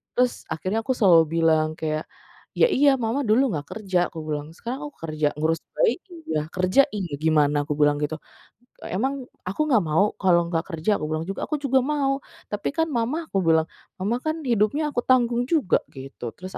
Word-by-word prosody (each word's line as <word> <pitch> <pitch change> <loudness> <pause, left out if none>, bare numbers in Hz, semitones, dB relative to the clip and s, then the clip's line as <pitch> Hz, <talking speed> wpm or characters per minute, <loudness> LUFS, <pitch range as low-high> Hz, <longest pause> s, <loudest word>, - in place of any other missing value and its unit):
terus 250 0 0
akhirnya 185 +7 -2
aku 260 +3 -1
selalu 175 -8 +6 0.2
bilang 155 -1 +3
kayak, 155 -1 -3 0.5
"Ya 485 - +4
iya 280 0 +5
Mama 235 +1 -1
dulu 245 +4 +3
nggak 145 -5 -4
kerja," 190 -5 -1
aku 160 -2 -8
bilang, 150 +1 -5
"sekarang 245 +7 -5
aku 290 - -13
kerja 155 -2 0
ngurus 160 +2 0 0.2
bayi 475 -6 +2
iya, 235 - -4
kerja 185 +9 +4
iya, 185 -6 -4
gimana?" 150 -2 +2
aku 150 - -1
bilang 145 0 +3
gitu, 150 +1 -2 0.7
"Emang 265 +8 -2 0.2
aku 190 +10 -4
nggak 220 -8 +4
mau 155 +6 +3
kalau 175 -3 +3
nggak 165 -1 -1
kerja?" 165 +6 0
aku 155 - -3
bilang 155 +1 -2
juga, 195 - -4
"Aku 305 - -1
juga 265 -1 +3
mau. 275 0 0 0.3
Tapi 210 - -2
kan 325 0 +1
Mama," 270 +6 -1
aku 195 - 0
bilang, 160 -1 +4 0.4
"Mama 225 +5 0
kan 315 +1 -2
hidupnya 250 +4 +1
aku 255 - -6
tanggung 245 -1 +3
juga." 285 - +2 0.2
gitu. 130 -4 -8
Terus 185 +8 -9
190 Hz, 190 wpm, -24 LUFS, 155-260 Hz, 0.7 s, selalu